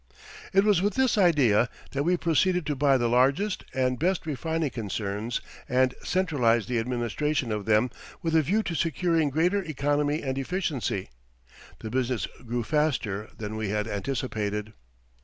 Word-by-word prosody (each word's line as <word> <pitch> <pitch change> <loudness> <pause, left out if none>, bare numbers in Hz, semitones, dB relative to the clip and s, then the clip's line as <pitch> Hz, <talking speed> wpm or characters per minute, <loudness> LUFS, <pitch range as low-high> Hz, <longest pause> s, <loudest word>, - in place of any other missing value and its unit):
It 195 0 +4
was 205 -4 +3
with 205 +2 0
this 265 -2 +3
idea 140 - +4 0.2
that 140 - -1
we 175 +4 +2
proceeded 175 +1 +2
to 150 - -1
buy 140 0 +4
the 120 -1 +1
largest 135 - +2
and 130 -1 0
best 180 +2 0
refining 160 0 -2
concerns 105 +1 -3 0.3
and 130 0 +3
centralize 130 - +2
the 125 -2 -1
administration 125 +3 -1
of 105 -2 -2
them 110 +3 +3 0.3
with 165 -1 0
a 160 - +6
view 205 +9 +1
to 175 - -3
securing 165 -1 +1
greater 175 +8 +2
economy 145 -2 0
and 135 -1 -2
efficiency. 135 - -2 0.7
The 110 - -6
business 125 -2 0 0.2
grew 120 0 -2
faster 120 -8 0
than 110 0 -5
we 110 -2 -2
had 105 +1 -1
anticipated. 105 -1 -3
135 Hz, 155 wpm, -27 LUFS, 115-165 Hz, 0.7 s, a